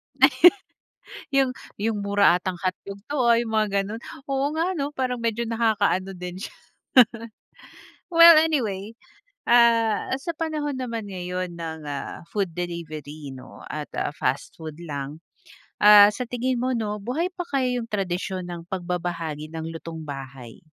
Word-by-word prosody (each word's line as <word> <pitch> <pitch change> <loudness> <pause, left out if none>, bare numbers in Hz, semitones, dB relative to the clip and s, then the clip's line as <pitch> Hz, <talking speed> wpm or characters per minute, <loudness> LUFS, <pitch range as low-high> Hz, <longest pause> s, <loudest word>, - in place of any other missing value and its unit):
Ay, - - +6 1.1
"Yung 265 -1 +3 0.4
yung 225 -2 0
mura 200 -3 +4
atang 180 0 -3
hotdog 195 +2 -4
to, 295 - -2
ah," 230 - +6
Yung 225 -2 -5
mga 215 -1 +3
gano'n, 215 +4 -6 0.3
oo 270 0 +1
nga 325 +2 +1
'no, 280 - 0
parang 250 -2 -1
medyo 230 0 -1
nakaka-ano 210 -4 +1
din 180 0 -5
siya. - - -7 1.6
Well 335 0 +10
anyway, 215 -11 -1 0.7
ah, 230 -2 +4
sa 335 - -2
panahon 300 -4 -2
naman 230 -5 -4
ngayon 180 -1 -4
ng 160 -1 -5
ah, 140 +3 -6
food 195 -5 -1
delivery 155 -5 -6
'no 130 0 -12
at 150 -1 -5
ah, 145 - -1
fast 135 +2 -2
food 160 -1 -8
lang. 145 -1 -6 0.6
Ah, 205 -1 +10
sa 230 - -4
tingin 245 0 -1
mo 255 - 0
'no, 210 -2 -3
buhay 325 - -2
pa 360 - -3
kaya 255 -3 0
yung 230 - -9
tradisyon 185 -2 -2
ng 175 -1 -8
pagbabahagi 170 -4 -3
ng 160 0 -6
lutong 160 -1 -7
bahay? 135 -4 -8
195 Hz, 150 wpm, -24 LUFS, 165-235 Hz, 1.6 s, Well